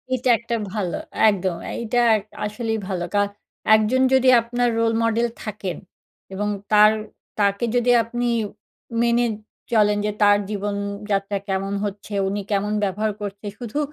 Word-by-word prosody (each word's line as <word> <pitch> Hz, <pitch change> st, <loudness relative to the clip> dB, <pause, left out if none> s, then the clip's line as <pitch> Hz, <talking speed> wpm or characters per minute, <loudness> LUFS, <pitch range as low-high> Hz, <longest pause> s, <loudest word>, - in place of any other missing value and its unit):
এটা 255 Hz, 0 st, -1 dB
একটা 235 Hz, 0 st, -3 dB, 0.2 s
ভালো, 190 Hz, -5 st, -2 dB, 0.3 s
একদম। 185 Hz, -3 st, -1 dB, 0.2 s
এইটা 235 Hz, +1 st, 0 dB, 0.4 s
আসলেই 225 Hz, +1 st, -2 dB
ভালো 180 Hz, -3 st, -2 dB
কা 205 Hz, -, +3 dB, 0.5 s
একজন 220 Hz, +4 st, +2 dB
যদি 260 Hz, 0 st, +5 dB
আপনার 245 Hz, +1 st, 0 dB
রোল 230 Hz, 0 st, +2 dB
মডেল 230 Hz, +1 st, +2 dB, 0.2 s
থাকেন, 205 Hz, -5 st, -4 dB, 0.6 s
এবং 205 Hz, +2 st, -2 dB, 0.2 s
তার, 210 Hz, 0 st, +7 dB, 0.5 s
তাকে 200 Hz, +2 st, +2 dB
যদি 245 Hz, 0 st, +3 dB
আপনি 240 Hz, +1 st, -2 dB, 0.7 s
মেনে 235 Hz, 0 st, +3 dB, 0.5 s
চলেন 210 Hz, -2 st, +4 dB
যে, 210 Hz, -, 0 dB
তার 205 Hz, 0 st, +6 dB
জীবনযাত্রা 200 Hz, 0 st, -2 dB
কেমন 195 Hz, +1 st, -1 dB
হচ্ছে? 205 Hz, +1 st, -6 dB
উনি 200 Hz, +1 st, -2 dB
কেমন 205 Hz, +1 st, 0 dB
ব্যবহার 210 Hz, +2 st, 0 dB
করছে? 205 Hz, 0 st, -6 dB
শুধু 240 Hz, +4 st, -4 dB
210 Hz, 135 wpm, -22 LUFS, 200-235 Hz, 0.7 s, তার